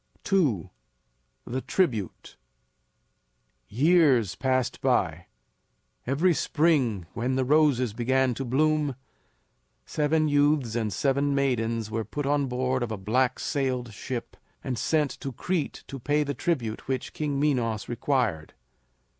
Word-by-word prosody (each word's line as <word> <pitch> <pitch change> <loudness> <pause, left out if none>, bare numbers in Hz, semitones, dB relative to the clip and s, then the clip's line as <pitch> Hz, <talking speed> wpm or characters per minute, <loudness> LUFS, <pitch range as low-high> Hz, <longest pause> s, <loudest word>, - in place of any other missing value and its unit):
II. 135 - +2 0.7
THE 130 +2 -3
TRIBUTE. 120 - -1 1.3
Years 135 - +3
passed 130 +3 -1
by. 90 -10 0 0.8
Every 160 +7 +3
spring 145 - +1
when 125 +3 -1
the 130 -1 +1
roses 135 -5 +3
began 130 +2 +1
to 135 - -4
bloom 150 +2 +1 0.9
seven 155 +1 +1
youths 145 -5 +2
and 110 -3 -1
seven 140 +6 +1
maidens 115 -5 0
were 115 0 -1
put 145 +7 -4
on 145 0 +1
board 130 +1 -1
of 120 -2 -2
a 110 - -3
black 125 +6 +1
sailed 130 -5 -2
ship 120 +3 -6 0.3
and 130 -2 -2
sent 150 -3 +1
to 135 - -5
Crete 165 +5 -3
to 135 - -8
pay 145 +5 +1
the 145 -1 -3
tribute 125 -7 -2
which 130 -1 -3
King 145 -2 -2
Minos 120 -7 0
required. 120 - -1
130 Hz, 125 wpm, -27 LUFS, 115-145 Hz, 1.3 s, Years